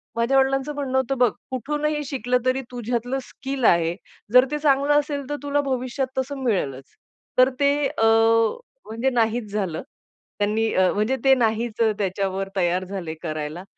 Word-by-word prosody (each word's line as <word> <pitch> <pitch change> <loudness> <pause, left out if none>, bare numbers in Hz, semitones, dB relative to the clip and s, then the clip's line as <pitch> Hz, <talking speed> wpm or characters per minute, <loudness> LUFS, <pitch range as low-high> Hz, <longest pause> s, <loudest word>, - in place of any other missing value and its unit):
माझ्या 235 +4 +2
वडिलांचं 270 +2 +1
म्हणणं 270 -2 -1
होतं, 265 +1 0
"बघ 245 -1 +4 0.2
कुठूनही 295 +4 -2
शिकलं 250 -3 0
तरी 255 +1 +1
तुझ्यातलं 245 +2 -2
स्किल 270 +1 -6
आहे, 170 -2 +3 0.4
जर 250 +1 +8
ते 300 - 0
चांगलं 285 -1 +3
असेल, 290 -1 -3
तर 290 - -1
तुला 285 0 +1
भविष्यात 260 -1 -2
तसं 265 +2 -2
मिळेलच." 140 - -1 0.5
तर 255 +1 +6
ते 280 -1 +4 0.2
अ, 225 - -3 0.8
म्हणजे 230 +4 -1
नाहीच 230 -3 0
झालं. 190 -6 -2 0.6
त्यांनी 215 +2 +1
अ, 185 -1 +3
म्हणजे 215 +6 +1
ते 270 -1 +6
नाहीच 230 -1 0
अ, 220 - +3
त्याच्यावर 195 0 -2
तयार 180 0 +1
झाले 185 -4 -5
करायला. 155 +1 -4
245 Hz, 155 wpm, -23 LUFS, 205-270 Hz, 0.8 s, जर